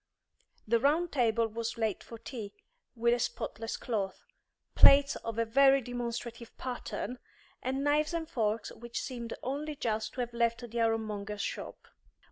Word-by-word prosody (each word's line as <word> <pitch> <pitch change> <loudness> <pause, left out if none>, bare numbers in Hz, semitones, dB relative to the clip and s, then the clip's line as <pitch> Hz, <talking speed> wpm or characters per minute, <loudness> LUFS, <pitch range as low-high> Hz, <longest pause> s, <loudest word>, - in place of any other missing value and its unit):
The 230 +2 +4
round 310 +7 +2
table 230 -4 +2
was 230 +1 -4
laid 220 -4 0
for 230 - -9
tea, 220 -3 -7 0.4
with 235 0 +3
a 240 - +1
spotless 225 -1 -3
cloth, 200 -5 -3 0.5
plates 275 0 +8
of 230 -1 -5
a 230 - +2
very 270 +4 +6
demonstrative 235 -1 -5
pattern, 250 0 -4 0.4
and 265 +2 -1
knives 295 +1 +3
and 325 -1 -2
forks 220 -4 -1
which 235 0 -5
seemed 235 -3 -5
only 290 +3 -2
just 220 -4 -1
to 250 - -2
have 240 -1 -3
left 235 +1 +1
the 235 +1 -2
ironmonger's 215 -2 -1
shop. - - -5
235 Hz, 150 wpm, -31 LUFS, 225-260 Hz, 0.5 s, plates